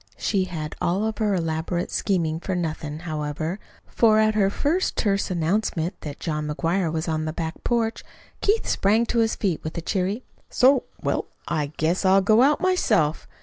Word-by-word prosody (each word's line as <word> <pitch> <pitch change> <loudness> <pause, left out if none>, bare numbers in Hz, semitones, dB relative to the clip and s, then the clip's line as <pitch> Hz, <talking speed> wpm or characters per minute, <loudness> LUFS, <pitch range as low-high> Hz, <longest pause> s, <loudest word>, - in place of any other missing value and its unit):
She 195 -3 0
had 160 -4 -5
all 190 +5 +1
of 220 0 -3
her 210 -3 +2
elaborate 165 +1 -2
scheming 165 -5 0
for 190 +1 -3
nothing, 155 -3 -3
however, 155 +2 -3 0.3
for 220 -2 +3
at 215 0 +4
her 200 -2 +3
first 310 - 0
terse 200 -2 +1
announcement 175 0 0
that 145 -2 -7
John 150 -2 -2
McGuire 165 +3 0
was 160 +1 -2
on 155 -1 -1
the 155 - -3
back 160 0 -5
porch, 230 -2 0 0.4
Keith 425 +3 +2
sprang 215 +4 +2
to 235 - 0
his 225 -1 +2
feet 185 -6 -1
with 160 +2 -5
a - - -2
cheery: 195 +7 -1 0.3
"So? 260 +1 +4 0.2
Well, - - -1 0.2
I 155 -3 0
guess 165 +5 +1
I'll 190 +1 +5
go 215 +4 +4
out 285 +3 +4
myself." 215 - +1
185 Hz, 180 wpm, -24 LUFS, 160-215 Hz, 0.4 s, I'll